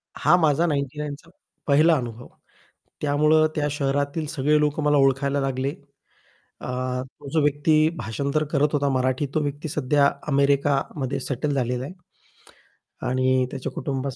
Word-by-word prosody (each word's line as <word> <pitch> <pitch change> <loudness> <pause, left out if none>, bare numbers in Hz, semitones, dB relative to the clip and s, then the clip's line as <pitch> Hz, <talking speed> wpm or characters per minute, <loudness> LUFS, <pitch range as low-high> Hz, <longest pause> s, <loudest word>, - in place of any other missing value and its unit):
हा 155 +4 +4
माझा 160 0 +2
99 145 -1 -2
चा 165 +4 -20 0.4
पहिला 155 +4 +5
अनुभव. 120 -2 -6 0.7
त्यामुळं 150 +2 +3
त्या 150 -1 0
शहरातील 145 +2 -1
सगळे 150 -1 +2
लोकं 150 +1 0
मला 150 0 +3
ओळखायला 135 +1 +2
लागले. 135 0 -1 0.9
अ, - - -7 0.3
तो 140 +2 -13
जो 160 - +3
व्यक्ती 155 +2 +3
भाषांतर 140 +5 -2
करत 150 0 +2
होता 145 -1 +1
मराठी, 130 +1 0
तो 155 - +2
व्यक्ती 145 +2 -3
सध्या 140 0 +2 0.2
अमेरिकामध्ये 140 -1 +1
सेटल 135 +3 -2
झालेला 125 -1 -1
आहे 145 - -7 1.2
आणि 130 0 +2
त्याच्या 135 -1 -5
कुटुंबा 140 -1 -3
140 Hz, 135 wpm, -24 LUFS, 135-150 Hz, 1.2 s, पहिला